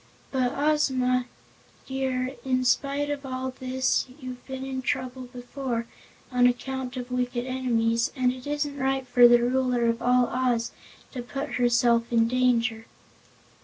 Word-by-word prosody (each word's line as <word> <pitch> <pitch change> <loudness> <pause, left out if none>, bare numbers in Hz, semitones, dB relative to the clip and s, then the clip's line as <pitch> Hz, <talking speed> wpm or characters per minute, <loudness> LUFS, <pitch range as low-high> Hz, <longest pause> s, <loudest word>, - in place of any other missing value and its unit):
But, 255 -1 +1
Ozma 260 -4 +1 0.6
dear, 265 -1 -2
in 255 -1 0
spite 280 +3 +1
of 290 -1 -4
all 260 -1 -4
this 260 0 0
you've 255 -2 -8
been 265 0 -5
in 265 -1 -3
trouble 255 0 -3
before, 245 -1 -4 0.5
on 250 -1 +5
account 255 +1 -3
of 250 0 -6
wicked 245 -1 -1
enemies, 235 -3 0
and 255 -2 +2
it 255 +1 -10
isn't 290 -1 -2
right 265 0 0
for 245 -1 +7
the 240 0 +5
Ruler 250 -1 +1
of 230 0 0
all 250 0 +4
Oz 245 -2 0 0.4
to 255 - -5
put 275 +3 -5
herself 235 -1 +3
in 230 -1 +4
danger." 240 -2 +1
255 Hz, 145 wpm, -26 LUFS, 245-265 Hz, 0.6 s, for